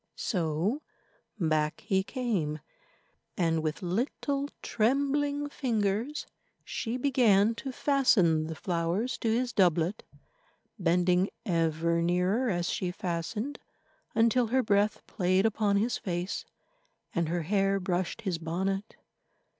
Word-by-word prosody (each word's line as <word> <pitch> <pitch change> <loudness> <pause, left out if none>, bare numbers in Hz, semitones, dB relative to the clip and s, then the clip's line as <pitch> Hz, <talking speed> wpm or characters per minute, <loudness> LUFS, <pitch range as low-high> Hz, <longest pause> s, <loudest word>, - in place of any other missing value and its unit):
So 180 - -1 0.6
back 155 -3 +1
he 190 -1 +1
came, 195 - -2 0.8
and 165 -3 +2
with 155 +5 -3
little 275 +9 -1
trembling 285 +5 +1
fingers 230 0 -1 0.4
she 230 +1 -3
began 230 -6 +4
to 270 - -5
fasten 200 - +3
the 160 - -5
flowers 175 +8 -1
to 230 - 0
his 240 +2 0
doublet, 175 0 +2 0.8
bending 180 +1 +3 0.2
ever 170 -2 +1
nearer 180 +8 +1
as 175 -3 0
she 180 - -1
fastened, 185 - -3 0.6
until 230 +2 +3
her 260 +3 +2
breath 205 0 +1
played 185 0 +1
upon 210 -2 +2
his 230 +4 0
face, 180 0 -3 0.7
and 170 -2 0
her 170 0 -1
hair 195 +2 +2
brushed 180 +3 -2
his 185 -6 -2
bonnet. 190 +5 -2
195 Hz, 115 wpm, -29 LUFS, 170-235 Hz, 0.8 s, began